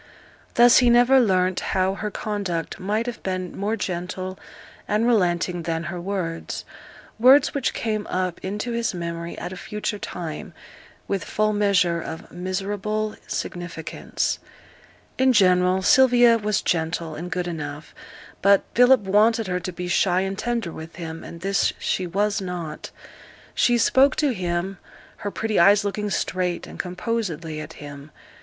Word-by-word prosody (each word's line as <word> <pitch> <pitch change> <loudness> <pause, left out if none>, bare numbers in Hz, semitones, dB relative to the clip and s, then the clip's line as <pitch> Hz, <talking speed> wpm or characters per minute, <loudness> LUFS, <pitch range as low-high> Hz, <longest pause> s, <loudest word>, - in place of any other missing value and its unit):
Thus 240 0 +7
he 245 -2 +4
never 245 +3 +6
learnt 185 -5 +2
how 190 0 0
her 210 +2 -4
conduct 200 -6 -3
might 210 +4 -1
have 245 -1 -5
been 185 -1 -3
more 205 +3 -1
gentle 185 -1 -4 0.5
and 215 +2 +1
relenting 180 -6 +1
than 165 0 -2
her 175 - -5
words 175 -3 -4 0.5
words 265 +6 +6
which 280 -4 -1
came 215 -2 -2
up 185 -2 -2
into 205 +5 -3
his 235 -4 -1
memory 170 0 -5
at 175 +2 -5
a - - -7
future 210 +2 -4
time, 165 -6 -6 0.5
with 195 -3 -1
full 215 0 0
measure 190 -5 +2
of 160 - -8
miserable 200 +4 -3
significance. 175 -2 -3 0.8
In 260 0 +5
general, 185 -2 +4
Sylvia 245 -1 +6
was 210 -1 0
gentle 165 -1 -1
and 170 +4 -6
good 180 -1 -2
enough; 150 -3 -6 0.5
but 200 0 +5
Philip 250 +1 +6
wanted 215 +3 +3
her 180 -1 -1
to 180 +1 -5
be 180 +1 -5
shy 180 +1 +2
and 195 0 -2
tender 235 -4 -2
with 160 +1 -9
him, 165 -1 -7
and 170 - -10
this 195 +1 +1
she 185 - -1
was 200 +3 0
not. 180 -4 -5 0.6
She 240 -1 +3
spoke 265 +4 +4
to 290 -4 +1
him, 180 0 -2 0.4
her 205 - -4
pretty 220 +1 -1
eyes 205 +4 +6
looking 210 +1 -2
straight 180 -2 -1
and - - -11
composedly 180 -5 -3
at - - -9
him. 145 0 -10
190 Hz, 150 wpm, -23 LUFS, 175-215 Hz, 0.8 s, Thus